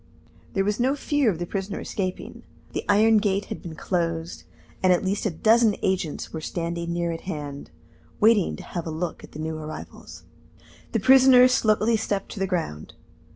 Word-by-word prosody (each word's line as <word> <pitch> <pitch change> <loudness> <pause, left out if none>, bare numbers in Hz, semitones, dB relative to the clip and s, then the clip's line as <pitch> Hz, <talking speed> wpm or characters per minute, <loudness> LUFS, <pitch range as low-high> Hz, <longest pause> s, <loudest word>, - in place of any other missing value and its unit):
There 195 - +1
was 210 +2 -1
no 260 +3 +2
fear 290 -3 +1
of 180 - -1
the 175 - -3
prisoner 195 +2 -4
escaping. 185 -2 -5 0.3
The - - -2
iron 220 +2 +5
gate 200 -1 0
had - - -10
been 165 -3 -8
closed, 165 -1 -3 0.4
and 185 - +4
at 180 +1 +2
least 200 +3 0
a - - +1
dozen 220 +5 +3
agents 185 -5 -2
were 160 - -4
standing 170 +1 -3
near 170 0 -1
at 165 - -5
hand, 145 - -6 0.5
waiting 215 -3 +4
to - - -10
have 170 -2 -5
a - - -2
look 160 +2 -4
at - - -13
the 150 - -8
new 160 0 -3
arrivals. 155 0 -9 0.7
The - - +2
prisoner 260 -1 +7
slowly 225 -2 +2
stepped 205 -2 -3
to - - -7
the 195 - 0
ground. 165 - -4
190 Hz, 185 wpm, -25 LUFS, 165-215 Hz, 0.7 s, prisoner